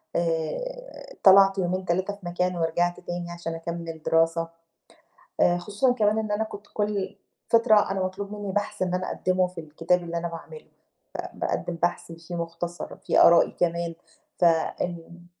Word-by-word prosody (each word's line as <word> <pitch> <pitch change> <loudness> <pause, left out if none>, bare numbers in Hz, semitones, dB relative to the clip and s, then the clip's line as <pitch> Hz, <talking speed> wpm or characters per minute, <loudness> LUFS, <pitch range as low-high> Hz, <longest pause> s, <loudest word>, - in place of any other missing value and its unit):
آآ - - -3
طلعت 195 0 +7
يومين، 185 0 -1
3 185 +3 0
في 200 -3 -16
مكان 180 +1 -1
ورجعت 175 +2 0
تاني 175 -1 -5
عشان 170 -1 -5
أكمِّل 165 -1 -6
دراسة. 165 0 +2 0.9
آآ 175 - +4
خصوصًا 205 +8 +1
كمان 215 -2 +2
إن 215 -1 -3
أنا 205 +1 +1
كنت 205 -2 -9
كل 205 -2 -1 0.3
فترة 220 -4 +5
أنا 190 -1 -1
مطلوب 195 +2 -4
منّي 205 -2 -4
بَحْث 205 0 -2
إن 180 -1 0
أنا 185 0 -1
أقدِّمه 185 0 +1
في 180 -2 -8
الكتاب 165 +3 0
اللي 170 0 -4
أنا 170 0 -2
باعمله. 170 - -10 0.5
فباقدّم 175 - -3
بحث 175 -1 0
فيه 165 +1 -9
مُختصر، 170 +1 -5
فيه - - +4
آرائي 170 0 +6
كمان، 170 -1 0 0.4
فإن 175 0 0
175 Hz, 150 wpm, -26 LUFS, 170-200 Hz, 0.9 s, طلعت